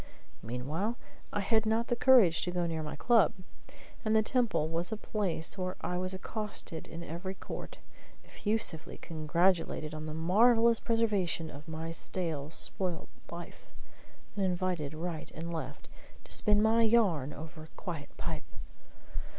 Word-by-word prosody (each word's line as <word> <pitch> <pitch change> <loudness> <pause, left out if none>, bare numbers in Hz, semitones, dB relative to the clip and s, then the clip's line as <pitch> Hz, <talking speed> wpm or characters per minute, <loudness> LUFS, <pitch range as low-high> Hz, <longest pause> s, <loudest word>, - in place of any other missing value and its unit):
Meanwhile, 150 - -2 0.3
I 205 - 0
had 220 +2 +3
not 220 +1 +1
the 240 - 0
courage 235 -10 +6
to 180 - 0
go 175 -1 0
near 165 -1 -2
my 150 -1 -5
club, 225 +7 +4 0.7
and 220 -1 +2
the 220 - +5
Temple 230 - +1
was 165 +5 -1
a 220 - -1
place 195 -5 -2
where 185 0 -2
I 180 0 -1
was 185 +1 -1
accosted 210 -4 -5
in 170 +1 -7
every 180 +5 -5
court, - - -7 0.5
effusively 205 -7 0
congratulated 165 0 +1
on 155 0 -5
the 155 - -4
marvellous 225 +7 +5
preservation 205 -8 +1
of 145 +2 -11
my 160 +1 -4
stale 165 -4 -2
spoilt 175 +1 -1 0.2
life, 170 0 -9 0.7
and 200 - 0
invited 180 -5 0
right 165 0 -4
and 170 +2 -4
left 140 -4 -5 0.4
to - - -13
spin 210 0 +4
my 225 +1 +5
yarn 205 - +3
over 155 +1 -9
a - - -21
quiet 160 -6 -5
pipe! - - -5
180 Hz, 150 wpm, -32 LUFS, 160-215 Hz, 0.7 s, courage